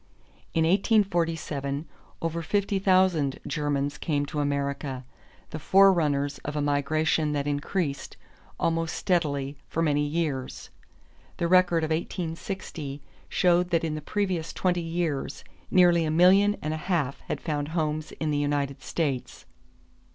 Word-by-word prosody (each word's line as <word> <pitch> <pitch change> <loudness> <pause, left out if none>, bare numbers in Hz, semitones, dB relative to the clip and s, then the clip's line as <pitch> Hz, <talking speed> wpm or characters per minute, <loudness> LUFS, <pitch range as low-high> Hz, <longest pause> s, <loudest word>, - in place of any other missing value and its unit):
In 160 - +3
1847 165 - +1 0.4
over 165 0 -1
fifty 200 +3 0
thousand 185 -7 +3
Germans 145 -1 -1
came 145 -4 0
to 150 - -4
America, 140 -2 -2 0.5
the 155 - -5
forerunners 150 -6 +3
of 145 - -6
a - - 0
migration 150 +2 +1
that 140 -1 -1
increased, 145 0 -2 0.4
almost 165 0 0
steadily, 145 -5 -1
for 165 - -1
many 145 -2 +2
years. 145 -4 -3 0.7
The 170 - 0
record 175 -2 +4
of 160 - -2
1860 160 -3 -4 0.3
showed 180 0 +3
that 165 -2 +1
in 160 -2 -1
the 155 - -4
previous 180 -1 -2
twenty 180 -2 0
years 165 -4 -3 0.3
nearly 175 -2 +5
a 155 - -1
million 190 +6 +5
and 155 +1 -1
a - - -2
half 155 -5 -1
had - - -2
found 145 -3 -2
homes 155 -1 -2
in 155 -1 -2
the 145 - +1
United 145 -1 -1
States. 140 -7 -3
155 Hz, 135 wpm, -27 LUFS, 145-175 Hz, 0.7 s, nearly